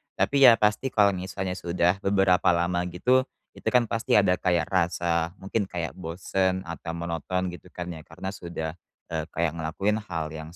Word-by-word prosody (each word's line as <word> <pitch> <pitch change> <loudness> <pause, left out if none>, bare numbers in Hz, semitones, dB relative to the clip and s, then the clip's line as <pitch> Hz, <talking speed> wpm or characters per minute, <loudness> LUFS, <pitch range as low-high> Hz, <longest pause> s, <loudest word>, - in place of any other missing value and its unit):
tapi 140 -2 +5
ya 115 - +9
pasti 105 +5 +1
kalau 105 -5 +4
misalnya 95 0 -4
sudah 90 +1 0
beberapa 95 -3 +3
lama 90 +1 0
gitu, 125 +9 +2 0.2
itu - - -11
kan 125 -1 +4
pasti 115 -1 +1
ada 95 -3 +4
kayak 90 -2 +1
rasa, 85 -1 0
mungkin 100 +1 -2
kayak 85 -3 -4
bosen 95 +2 -1
atau 85 -1 -6
monoton 85 +2 -2
gitu 90 +1 -11
kan 90 0 -6
ya, 80 -2 -10
karena 95 - -6
sudah, 85 -4 -5 0.4
eee, - - -2
kayak 85 -1 +1
ngelakuin 85 +7 -1
hal 85 -7 -4
yang 80 +2 -8
90 Hz, 170 wpm, -26 LUFS, 85-100 Hz, 0.4 s, ya